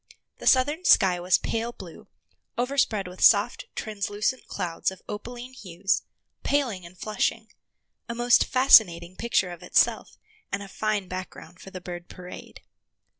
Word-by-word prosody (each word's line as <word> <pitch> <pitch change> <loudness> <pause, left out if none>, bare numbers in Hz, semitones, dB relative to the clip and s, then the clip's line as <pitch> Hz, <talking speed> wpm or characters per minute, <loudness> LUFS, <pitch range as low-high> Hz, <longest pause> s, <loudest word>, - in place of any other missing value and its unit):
The - - -5
southern 290 +7 +3
sky 185 - +5
was 180 +1 +3
pale 230 +1 -3
blue, - - -12 0.5
overspread 245 -6 0
with 180 +1 -11
soft, - - +4
translucent 210 +3 -3
clouds 175 -4 -2
of 190 - -12
opaline 240 +4 -7
hues, 195 -4 -2 0.4
paling 235 -12 -1
and 180 +2 -17
flushing—a 220 +2 -5
most 240 0 +4
fascinating 185 -10 +5
picture 210 -6 0
of 175 - -10
itself, - - +1 0.3
and 200 0 -3
a - - -9
fine 210 -1 -2
background 180 -1 -8
for - - -11
the 185 -1 -9
bird 175 -1 -8
parade. 180 -1 -11
205 Hz, 135 wpm, -26 LUFS, 180-240 Hz, 0.5 s, sky